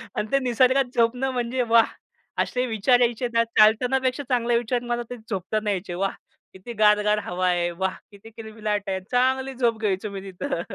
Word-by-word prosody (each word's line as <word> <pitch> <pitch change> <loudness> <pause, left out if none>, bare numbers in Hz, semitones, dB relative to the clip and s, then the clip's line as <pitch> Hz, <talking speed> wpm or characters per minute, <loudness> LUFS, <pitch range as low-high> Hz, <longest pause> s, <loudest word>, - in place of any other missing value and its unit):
आणि 210 - -2
ते 275 - +3
निसर्गात 255 +1 +3
झोपणं 245 +3 +1
म्हणजे 250 0 -2
वाह! 230 0 +6 0.6
असे 250 0 -2
विचार 240 +1 +2
यायचे 240 0 +1
ना, 230 0 +4
चालतानापेक्षा 255 +5 +3
चांगले 240 -2 +2
विचार 240 +1 -1
मला 240 0 -2
ते 245 - -6
झोपताना 210 +2 -2
यायचे. 185 -2 -4
वाह! 195 +2 -1 0.4
किती 190 +6 -9
गार-गार 210 0 +4
हवा 180 +1 -1
आहे, 175 -1 +1
वाह! 190 +2 -2 0.2
किती 200 +2 -14
किलबिलाट 215 -2 -4
आहे. 190 0 -1
चांगली 260 +2 +1
झोप 235 -3 0
घ्यायचो 210 -1 -1
मी 195 -1 -6
तिथं. 185 0 -3
230 Hz, 175 wpm, -24 LUFS, 205-250 Hz, 0.6 s, वाह